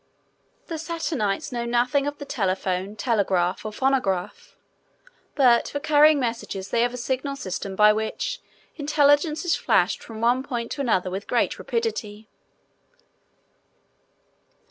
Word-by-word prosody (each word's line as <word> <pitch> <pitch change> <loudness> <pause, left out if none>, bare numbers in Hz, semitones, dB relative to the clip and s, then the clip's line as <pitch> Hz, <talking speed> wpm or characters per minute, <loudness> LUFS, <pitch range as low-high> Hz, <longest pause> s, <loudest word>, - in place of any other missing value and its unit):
The 325 -2 -5
Saturnites 310 - -2
know 240 -1 -2
nothing 245 +4 +1
of 290 0 -4
the 285 - -8
Telephone, 190 -3 -2
Telegraph, 195 -6 0
or 215 - -5
Phonograph. 210 -7 -1 0.8
But 250 -5 +4
for 285 - -4
carrying 300 0 +5
messages 230 -6 -4
they 230 - +2
have 245 +1 0
a - - -6
signal 260 +3 -2
system 195 -4 -5
by 210 +1 +6
which 220 - -3 0.4
intelligence 295 +2 +2
is 350 - +2
flashed - - +1
from 225 -1 -9
one 240 +3 +2
point 240 -4 -4
to 285 - -3
another 190 -8 0
with 195 +2 -5
great - - 0
rapidity. 220 - -3
240 Hz, 130 wpm, -24 LUFS, 210-285 Hz, 0.8 s, by